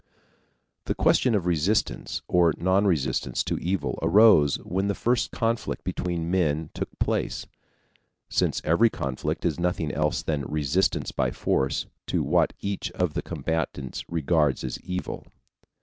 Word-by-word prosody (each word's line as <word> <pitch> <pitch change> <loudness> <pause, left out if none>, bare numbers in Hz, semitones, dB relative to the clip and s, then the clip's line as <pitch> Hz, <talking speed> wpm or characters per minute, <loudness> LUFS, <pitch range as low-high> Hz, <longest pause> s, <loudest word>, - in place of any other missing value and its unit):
The - - -1
question 125 -4 +3
of 95 -4 0
resistance 90 +5 0
or 85 -3 +3
non 95 +3 +2
resistance 80 -8 0
to - - -2
evil 90 -4 -2
arose 80 -4 +6
when 95 +3 -1
the 100 - 0
first 120 -1 +1
conflict 115 0 -2
between 85 -2 -2
men 80 -4 0
took - - -4
place, - - -1 0.8
since - - 0
every 100 +9 +4
conflict 65 -10 -3
is - - 0
nothing 85 -4 0
else 75 +2 0
than 75 -3 -1
resistance 75 +5 0
by 65 -1 0
force 65 +2 0 0.2
to - - 0
what - - +2
each 100 -1 -3
of 90 -4 -1
the - - -1
combatants 80 -5 -3
regards 80 -3 +1
as 65 - -4
evil. 90 0 -5
85 Hz, 140 wpm, -26 LUFS, 75-95 Hz, 0.8 s, arose